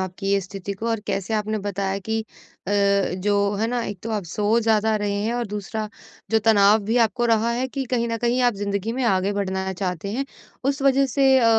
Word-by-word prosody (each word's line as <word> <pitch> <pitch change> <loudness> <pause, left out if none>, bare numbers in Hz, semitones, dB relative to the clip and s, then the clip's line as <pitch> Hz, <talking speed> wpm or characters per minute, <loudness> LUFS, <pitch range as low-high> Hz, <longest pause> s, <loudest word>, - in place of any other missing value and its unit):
आपकी 190 +1 -4
ये 200 - +3
स्थिति 195 +1 -6
को 220 +4 -5
और 225 -2 0
कैसे 195 +3 -2
आपने 215 0 -1
बताया 195 -1 -2
कि 220 +3 -2 0.5
अ, - - 0 0.5
जो, 200 +1 +1
है 220 +2 0
ना, 245 -1 -1
एक 200 - -5
तो 225 - -4
आप 210 -4 -2
सो 210 +6 +1
ज़्यादा 220 -1 +2
रहे 205 -1 -1
हैं, 230 - 0
और 240 -2 -1
दूसरा 210 +1 -4 0.4
जो 225 - +4
तनाव 205 0 +6
भी 225 +4 0
आपको 240 +2 -1
रहा 230 0 +2
है 245 +2 0
कि 270 0 -3
कहीं 235 -2 +1
न 230 - -1
कहीं 240 +2 +1
आप 245 -3 +3
ज़िंदगी 200 +2 -2
में 260 +1 -2
आगे 195 -1 +2
बढ़ना 190 -1 -2
चाहते 185 0 -3
हैं। 270 +4 -1 0.4
उस 280 0 0
वजह 275 0 +4
से 270 +2 +2
अ, 245 - +2
215 Hz, 225 wpm, -23 LUFS, 200-230 Hz, 0.5 s, तनाव